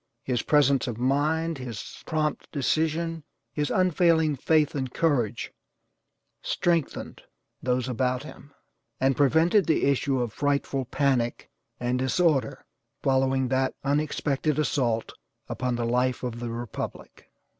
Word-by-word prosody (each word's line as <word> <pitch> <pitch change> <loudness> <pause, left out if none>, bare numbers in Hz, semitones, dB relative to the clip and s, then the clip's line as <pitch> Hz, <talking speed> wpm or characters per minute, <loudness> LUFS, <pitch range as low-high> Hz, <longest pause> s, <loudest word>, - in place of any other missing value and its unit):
His 125 -3 0
presence 140 -3 +3
of 120 -3 -3
mind, 150 +5 0
his 120 -5 -7
prompt 155 -2 -1
decision, 160 +3 0 0.3
his 150 -1 -1
unfailing 165 -4 +3
faith 150 +2 +2
and 130 -3 -3
courage 120 -9 0 0.9
strengthened, 170 -4 -1 0.4
those 125 0 0
about 125 +1 -1
him, 145 -1 -12 0.5
and 135 0 +2
prevented 160 +8 +3
the 160 - +2
issue 140 -1 +1
of 120 -2 -1
a - - -23
frightful 140 -2 0
panic 130 -2 0 0.3
and 125 +1 0
disorder 130 -1 +1 0.4
following 130 -1 +2
that 130 0 +1
unexpected 145 0 0
assault 120 -6 0 0.3
upon 125 -1 -2
the 120 0 -1
life 125 +2 0
of 120 -2 -4
the 120 0 -4
republic. 120 0 -7
135 Hz, 125 wpm, -26 LUFS, 125-155 Hz, 0.9 s, presence